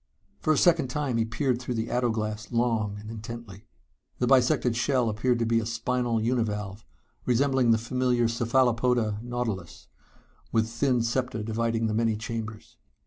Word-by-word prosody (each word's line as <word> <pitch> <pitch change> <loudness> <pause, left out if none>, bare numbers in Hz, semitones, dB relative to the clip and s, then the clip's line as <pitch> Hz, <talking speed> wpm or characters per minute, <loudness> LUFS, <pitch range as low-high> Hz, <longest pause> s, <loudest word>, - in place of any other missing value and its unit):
For 155 - +1
a 155 - +3
second 165 -5 +4
time 130 -2 -1
he 115 - +2
peered 120 +2 -1
through 125 -1 -3
the 110 0 -2
ato 125 -1 +1
glass 110 -1 -3
long 115 -4 0
and 105 +1 -10
intently. 115 -2 -9 0.5
The 125 - +1
bisected 125 -2 +3
shell 125 -1 +1
appeared 120 +3 +1
to 115 - 0
be 115 0 +2
a 110 - -3
spinal 115 0 0
univalve, 110 -3 -1 0.4
resembling 130 0 +3
the 115 - +5
familiar 120 +1 +1
cephalopoda, 120 -2 +1
nautilus, 115 -7 -4 0.6
with 110 -1 +2
thin 120 +1 +1
septa 120 -2 -1
dividing 115 +1 -1
the 110 - 0
many 115 0 +1
chambers. 115 +1 -6
115 Hz, 155 wpm, -27 LUFS, 110-125 Hz, 0.6 s, the